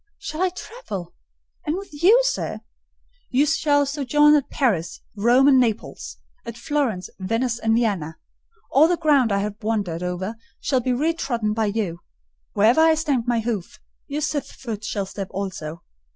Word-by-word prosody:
"Shall 330 -5 -6
I 375 - +3
travel?—and 175 - -8
with 350 -7 -9
you, 420 +8 +7
sir?" - - -2 0.7
"You 275 +3 +3
shall 295 -2 +2
sojourn 295 +1 +3
at 290 -3 +2
Paris, 190 - 0 0.2
Rome, 240 +6 +4
and 270 -2 +6
Naples: 225 - -2 0.3
at 235 0 -7
Florence, 265 - -1
Venice, 230 +5 -1
and 225 -1 +2
Vienna: 195 -10 -1 0.5
all 290 +4 +6
the 350 0 +1
ground 285 -8 +3
I 200 0 +1
have 210 +1 -5
wandered 205 -6 -2
over 180 +5 -3 0.2
shall 265 - +1
be 255 - -1
re 300 +7 +1
trodden 235 -9 -1
by 220 0 0
you: 200 -5 -2 0.5
wherever 230 +9 +4
I 320 0 +5
stamped 285 -7 -1
my 235 -2 +1
hoof, 215 -6 -4 0.3
your 295 +1 -3
sylph's 295 -1 -2
foot 220 -4 -6
shall 205 -2 -2
step 195 0 -6
also. 170 -5 -5
235 Hz, 160 wpm, -23 LUFS, 200-295 Hz, 0.7 s, you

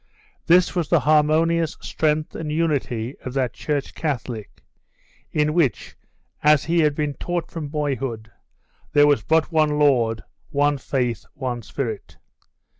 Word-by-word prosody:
This 180 +1 +5
was 175 -4 -1
the 170 -4 +4
harmonious 155 +2 +2
strength 155 0 -1
and 155 -2 -5
unity 140 -7 -1
of 130 0 -6
that 130 -3 0
Church 145 -3 -3
Catholic, 125 -8 -4 0.7
in 150 0 +1
which, 160 -7 0 0.5
as 150 -2 +5
he 170 +1 +1
had 150 -3 +3
been 150 -1 -1
taught 175 +3 -4
from 160 -3 -5
boyhood, 135 -7 -3 0.6
there 145 0 +6
was 145 -1 +3
but 160 +1 +1
one 155 -2 +2
Lord, 120 -6 +2 0.3
one 145 0 +1
Faith, 125 -4 -2
one 125 -4 -3
Spirit. 115 -2 -5
150 Hz, 135 wpm, -22 LUFS, 130-155 Hz, 0.7 s, there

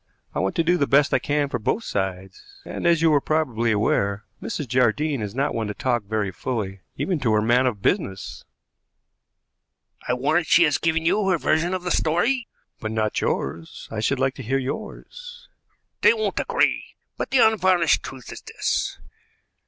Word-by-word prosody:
"I - - -2
want 95 - -1
to 165 - +2
do 175 +2 +2
the 140 - +1
best 140 +1 +3
I - - +4
can 145 0 0
for 140 - -3
both 210 - -1
sides, 95 - -4 0.2
and, - - -3
as 165 -1 +3
you 160 -2 +5
are 145 - +4
probably 125 -8 0
aware, 100 -1 +1 0.2
Mrs. 145 - -4
Jardine 130 +3 +1
is 105 +1 -5
not 140 +2 0
one 115 -2 -2
to 105 - -5
talk 120 -4 -1
very 105 -1 -1
fully, 100 -2 -4 0.2
even 180 -5 -1
to 120 -5 +1
her 105 - +3
man 125 +3 +3
of 105 -6 -3
business." 95 -1 -1 1.6
"I 125 - +1
warrant 155 +6 +1
she 170 - +6
has 150 -4 +2
given 160 0 0
you 195 +3 +2
her 185 - +3
version 165 +4 +1
of 185 - -5
the 180 - -2
story." 230 +13 +1 0.3
"But 110 - -4
not 110 -1 -1
yours. 80 +4 -3
I 110 - -3
should 130 +6 +1
like 135 0 +1
to - - -6
hear 135 +3 0
yours." 485 - -7 0.5
"They 465 - +6
won't 440 - -1
agree; - - 0 0.2
but - - -4
the 265 - +2
unvarnished 190 -8 +4
truth 130 -2 -9
is - - -9
this. - - -2
135 Hz, 185 wpm, -23 LUFS, 110-165 Hz, 1.6 s, she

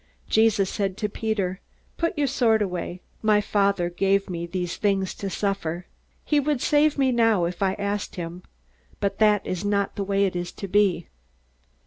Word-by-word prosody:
Jesus 220 -3 +3
said 195 -2 -2
to 210 - -1
Peter: 200 -3 -2 0.4
"Put 335 +1 -1
your 290 - +2
sword 230 -5 +2
away. 180 -1 -4 0.2
My 215 -1 +4
Father 200 -3 +1
gave 195 +2 +1
me 170 -1 -4
these 175 -1 -3
things 195 -2 0
to 200 - -5
suffer. 185 -3 -2 0.4
He 295 - +3
would 290 -1 0
save 295 +3 +3
me 265 -2 +3
now 225 -7 +3
if 175 +2 -5
I 190 -1 +2
asked 200 0 -3
him. 175 0 -6 0.6
But 200 -1 -1
that 210 -2 +4
is 185 +1 -3
not 200 -1 0
the 200 - -1
way 200 0 +2
it 185 - -2
is 175 0 -3
to 195 - -6
be." 190 -3 +2
200 Hz, 175 wpm, -25 LUFS, 185-215 Hz, 0.6 s, My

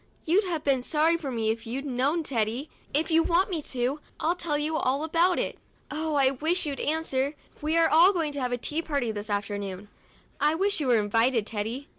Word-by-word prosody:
You'd 375 +6 +3
have 335 -4 -2
been 270 -3 +2
sorry 315 +5 +2
for 320 -5 -4
me 225 -3 0
if 225 0 -6
you'd 265 +5 -4
have 270 - -4
known, 285 +7 +1
Teddy. 240 +1 -2 0.2
If 310 +4 +1
you 325 +1 +5
want 350 +4 +2
me 330 -4 -1
to, 260 +1 -2 0.2
I'll 330 - +1
tell 330 -4 -1
you 305 +2 -1
all 275 0 0
about 340 +3 +2
it. - - -2 0.3
Oh, 310 0 -2
I 270 -2 +4
do - - -3
wish 345 +3 +2
you'd 285 -2 -3
answer! 295 -2 -1 0.3
We 310 +2 +1
are 330 -1 +5 0.2
going 330 -6 -1
to 285 -1 -4
have 250 -1 -1
a 245 - 0
tea 300 +6 -2
party 280 -8 -1
this 210 0 -5
afternoon; 205 -1 -3 0.5
I 300 +2 +3
wish 395 +3 +1
you 290 - -1
were 245 -2 +5
invited, 225 +2 +2
Teddy! 230 +6 -4
285 Hz, 220 wpm, -27 LUFS, 240-320 Hz, 0.5 s, you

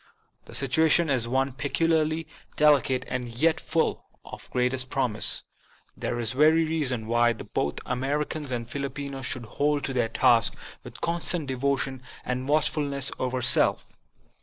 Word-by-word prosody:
The - - -10
situation 160 +4 +3
is 125 -3 +1
one 135 +2 0
peculiarly 160 +2 0 0.3
deli 150 -2 +6
cate 130 -1 -2
and 125 -1 -3
yet 155 +8 +1
full 165 - -1 0.2
of - - -10
the - - -20
greatest 125 +1 0
promise. 125 -6 +2 0.5
There 120 - -3
is 115 -1 0
every 155 +4 +4
reason 140 -8 -1
why 120 +1 +3
both 75 -9 -3
Americans 145 +3 -2
and 120 -2 -3
Filipinos 140 0 -5
should 125 -2 -3
hold 145 +5 0
to 135 - -2
their 120 -3 0
tasks 115 0 +3 0.3
with - - -8
constant 170 -1 0
devotion 135 0 -1 0.2
and 130 +2 -3
watchfulness 145 -2 0
over 130 0 -2
self. - - +3
135 Hz, 145 wpm, -26 LUFS, 125-150 Hz, 0.5 s, deli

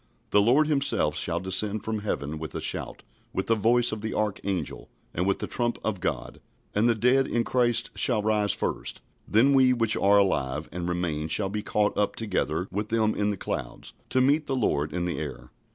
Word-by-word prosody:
"The 105 - +5
Lord 130 +9 +4
himself 145 -3 +1
shall 85 - 0
descend 100 +3 -1
from 110 -1 -2
heaven 80 -7 -3
with 80 -3 -7
a - - -2
shout, - - -3 0.3
with - - -1
the 115 - +3
voice 120 +3 +3
of 110 -1 -4
the 110 - -4
archangel, 100 -5 -3 0.2
and 90 +3 -1
with 100 - +2
the - - -3
trump 120 -1 -1
of 105 -4 -2
God: 95 - -4 0.3
and 110 +3 +3
the 115 - +3
dead 125 +4 +3
in 120 - 0
Christ 120 -3 +1
shall 110 -5 +1
rise 105 -1 +2
first: - - -3 0.3
then 125 +7 +4
we 130 -1 +5
which 115 -2 +2
are 100 +1 +4
alive 75 -7 +1
and 90 0 -4
remain 85 -3 -2
shall 95 +5 +1
be 105 +2 -3
caught 105 0 0
up 105 - 0
together 95 -5 -1
with 105 +2 -3
them 110 -1 +2
in 105 0 0
the 100 - -2
clouds, 60 -8 -5 0.2
to 130 - +2
meet 145 +3 +2
the 135 - -1
Lord 75 - 0
in 90 +1 -2
the 85 - -2
air." 70 -5 -7
105 Hz, 205 wpm, -26 LUFS, 90-120 Hz, 0.3 s, The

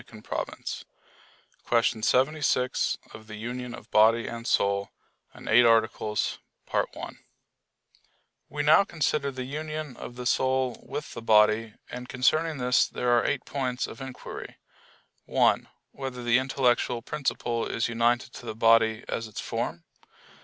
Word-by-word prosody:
_______________________ 110 -2 -5 0.8
QUESTION 115 -1 +1
76 130 +1 +1 0.2
OF 110 0 -12
THE 105 - -8
UNION 120 +2 -5
OF 110 - -14
BODY 115 +2 +5
AND 115 0 -6
SOUL 100 0 +1 0.5
(In - - -12
Eight 120 +2 +6
Articles) 110 -2 +2 2.1
We 145 +1 -2
now 155 +6 +6
consider 150 -5 -1
the 130 -1 -5
union 155 0 -5
of 120 - -8
the 125 0 -7
soul 130 0 +1
with 150 - -5
the 115 - -7
body; 110 0 +4 0.2
and 125 0 -7
concerning 155 +5 +1
this 125 0 +3
there 125 0 -1
are 120 - +3
eight - - -1
points 130 -3 -2
of - - -10
inquiry: 135 -1 -8 0.7
(1) - - +2 0.2
Whether 130 -2 -6
the 120 +1 +4
intellectual 125 -2 +1
principle 120 -5 -2
is 115 - -1
united 120 +1 +1
to - - -10
the - - -4
body 115 0 +4
as 115 - -3
its 105 - -8
form? - - -3
125 Hz, 135 wpm, -27 LUFS, 115-130 Hz, 2.1 s, Eight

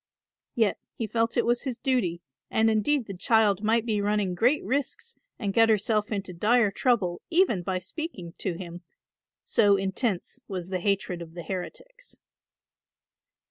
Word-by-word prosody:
Yet 225 -5 +2 0.2
he 230 - -2
felt 230 +1 0
it - - +3
was 240 0 +2
his 255 -4 -4
duty 235 - 0 0.3
and 220 0 +3
indeed 240 +5 +1
the 195 - -7
child 205 0 +3
might 225 +1 +2
be 215 -3 0
running 205 -2 0
great 245 +11 +2
risks 285 - -2 0.2
and 200 -4 -2
get 225 +1 +5
herself 215 0 +1
into 195 -3 -3
dire 215 +4 +3
trouble 195 -6 +1
even 335 - +3
by 185 +1 -2
speaking 185 - -6
to 185 - -1
him, 175 -1 -8 0.6
so 205 -2 +4
intense 195 +3 -2
was 185 -3 -5
the 185 -1 -1
hatred 190 -2 -1
of 165 0 -10
the 170 - -6
heretics. - - -7
210 Hz, 155 wpm, -27 LUFS, 185-235 Hz, 0.6 s, get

